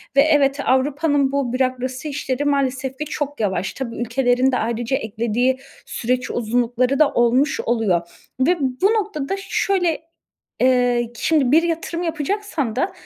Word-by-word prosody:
Ve 275 - +7
evet 285 -2 +3
Avrupa'nın 280 +1 +2
bu 275 -4 -1
bürokrasi 255 +2 -2
işleri 285 -1 -2
maalesef 270 -2 0
ki 300 - -3
çok 290 0 -4
yavaş. 195 -2 -1
Tabii, 245 -4 -5
ülkelerin 245 +2 +1
de 250 - +1
ayrıca 235 +3 -1
eklediği 235 +4 0 0.3
süreç 250 +2 -2
uzunlukları 245 +3 0
da 305 - +5
olmuş 250 +4 +2
oluyor 205 -8 0 0.3
ve 340 +7 +3
bu 265 +4 -1
noktada 390 -7 -2
şöyle, 370 -4 0 0.6
eee, 245 -2 +3
şimdi 280 0 +2
bir 320 +3 +5
yatırım 335 0 -2
yapacaksan 325 - -2
da 360 +10 0
265 Hz, 140 wpm, -21 LUFS, 245-295 Hz, 0.6 s, Ve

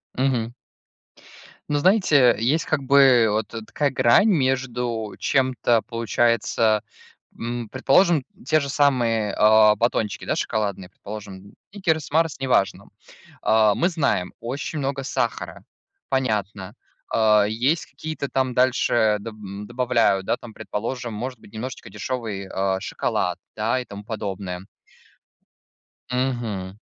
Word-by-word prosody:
Мгм. 125 -3 0 1.2
Ну, 145 0 +1
знаете, 155 - +4
есть 145 +8 +1
как 155 -3 0
бы 135 -4 +6
вот 105 0 -1
такая 120 +5 -2
грань 130 - +4
между 125 - -1
чем-то, 130 -3 +2
получается, 115 -2 +1 0.6
м, 120 -1 -4
предположим, 145 +3 +3 0.2
те 155 +3 +3
же 140 - -4
самые, 120 -7 +1
а, 105 0 +6
батончики, 115 -3 -1
да, - - 0
шоколадные, 100 -4 -2
предположим, 100 -1 -10 0.2
"Сникерс", 165 -7 -1
"Марс", 160 -2 +1
неважно. 125 -7 +1 0.5
А, 110 -2 +4
мы 175 - +2
знаем, 140 - -1
очень 140 +5 -4
много 135 0 -2
сахара, 120 -3 -3 0.5
понятно. 105 -6 -2 0.4
А, 105 -2 +4
есть 125 +10 0
какие-то 155 -3 -6
там 130 -2 0
дальше, 120 -4 +2
да, 115 +2 -7
доб 105 -1 -8
добавляют, 120 -6 +1
да, - - 0
там, 115 -3 -12
предположим, 120 +3 -5
может 125 +3 -5
быть, - - -17
немножечко 125 +4 -7
дешевый, 110 -7 -4
а, 95 0 -1
шоколад, 90 -2 -2 0.2
да, 115 +4 0
и - - -9
тому 100 0 -10
подобное. 95 -4 -5 1.4
Мгм. 115 -7 -2
120 Hz, 120 wpm, -23 LUFS, 105-135 Hz, 1.4 s, бы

